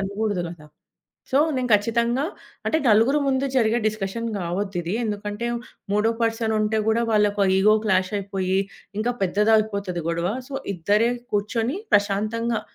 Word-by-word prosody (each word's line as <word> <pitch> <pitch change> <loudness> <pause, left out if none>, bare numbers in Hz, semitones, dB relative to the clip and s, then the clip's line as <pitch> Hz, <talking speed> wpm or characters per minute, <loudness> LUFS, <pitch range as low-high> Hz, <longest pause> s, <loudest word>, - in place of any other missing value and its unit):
అనగూడదు 200 -2 -2
గదా! 155 -3 -12 0.7
సో, 270 - +4 0.2
నేను 250 -1 -1
ఖచ్చితంగా 235 +5 +1 0.4
అంటే, 315 - +2
నలుగురు 230 +7 +4
ముందు 270 +1 +1
జరిగే 230 -1 +3
డిస్కషన్ 215 +2 -4
గావొద్దిదీ. 180 0 -3
ఎందుకంటే, 210 +2 -3 0.5
మూడో 210 +2 +3
పర్సనుంటే 220 -1 +1
గూడా 230 +1 +2
వాళ్ళకు 205 -1 +2
ఆ - - +2
ఇగో 215 +2 +5
క్లాషయిపోయి, 190 0 0 0.4
ఇంకా 240 +3 0
పెద్దదయిపోతది 200 -2 +1
గొడవ. 170 +1 0 0.2
సో, 275 - -8 0.2
ఇద్దరే 205 +7 +2 0.2
కూర్చొని 225 - -1
ప్రశాంతంగా 215 +3 +1
210 Hz, 120 wpm, -23 LUFS, 195-230 Hz, 0.7 s, ఇగో